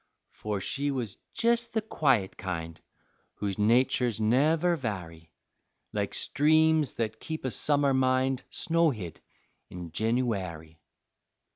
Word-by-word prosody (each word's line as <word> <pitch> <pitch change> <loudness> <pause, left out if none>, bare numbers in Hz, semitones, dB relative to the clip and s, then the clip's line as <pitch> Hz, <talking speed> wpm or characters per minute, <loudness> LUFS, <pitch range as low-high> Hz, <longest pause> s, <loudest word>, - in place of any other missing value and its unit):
For 105 -2 -4
she 140 +8 -2
was 120 -7 -3 0.2
jes' 235 0 +3
the 230 -1 -1
quiet 135 - +1
kind 85 -4 -5 0.5
Whose 100 -1 -3
naturs 120 +1 +2
never 155 +10 +3
vary, 85 - -6 0.6
Like - - -2
streams 155 0 +3
that 110 -1 -3
keep 160 -3 -6
a 130 - -1
summer 145 0 +2
mind 130 0 +2
Snowhid 150 - 0 0.5
in 90 -2 -8
Jenooary. 95 -8 -2
125 Hz, 110 wpm, -28 LUFS, 100-145 Hz, 0.6 s, jes